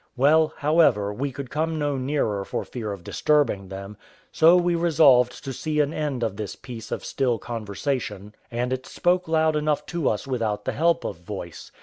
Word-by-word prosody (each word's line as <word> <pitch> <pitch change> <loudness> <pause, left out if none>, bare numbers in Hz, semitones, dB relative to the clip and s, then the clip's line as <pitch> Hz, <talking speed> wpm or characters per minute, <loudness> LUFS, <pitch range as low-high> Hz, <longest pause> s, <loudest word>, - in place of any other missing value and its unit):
Well, 155 +4 +4
however, 145 -10 +3
we 135 +6 -3
could 130 -1 -7
come 160 +1 -1
no 145 -2 0
nearer 130 -7 -1
for - - -3
fear 110 -4 -5
of 100 -3 -7
disturbing 140 - +1
them: 100 +2 -8 0.3
so 165 +2 +6
we 175 0 +2
resolved 145 -7 +4
to 135 -1 -4
see 155 +4 -2
an 145 +1 +2
end 145 -5 -2
of 110 -4 -2
this 105 -2 -5
piece 115 -4 -9
of - - -4
still 125 -4 0
conversation, 105 -1 -4 0.2
and 125 +2 -1
it 130 0 -5
spoke 180 0 +1
loud 160 -1 +2
enough 150 -1 0
to 170 -5 +1
us 105 - -2
without 115 -6 -2
the - - 0
help 170 +2 +2
of - - -4
voice. 90 -1 -8
135 Hz, 190 wpm, -24 LUFS, 105-155 Hz, 0.3 s, so